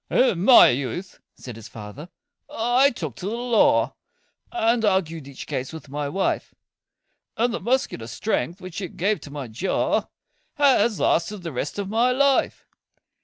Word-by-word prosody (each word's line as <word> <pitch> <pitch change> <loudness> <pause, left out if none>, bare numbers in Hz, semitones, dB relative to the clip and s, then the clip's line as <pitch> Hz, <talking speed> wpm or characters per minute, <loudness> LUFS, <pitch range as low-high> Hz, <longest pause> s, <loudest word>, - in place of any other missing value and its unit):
"In 190 -9 +2
my 255 - +9
youth," 140 +9 -3 0.2
said 125 -3 -9
his 115 - -10
fater, 110 +10 -10 0.4
"I 250 0 +3
took 155 - -6
to 185 - -5
the 220 - -2
law, 240 -2 +2 0.6
And 230 -8 +1
argued 165 -7 0
each 140 -2 -9
case 130 0 -4
with 160 -3 -10
my 145 +1 -3
wife; 190 +6 -2 0.8
And 235 +1 +1
the - - -2
muscular 235 - -1
strength, 175 - -2
which 185 0 -7
it 185 - -7
gave 200 +4 0
to - - -10
my 140 -3 -6
jaw, 120 - -1 0.5
Has 265 -7 +3
lasted 180 +3 0
the 165 - -5
rest 140 +6 -4
of 200 -1 -3
my 230 +5 +2
life." 275 +1 +1
190 Hz, 160 wpm, -23 LUFS, 145-235 Hz, 0.8 s, my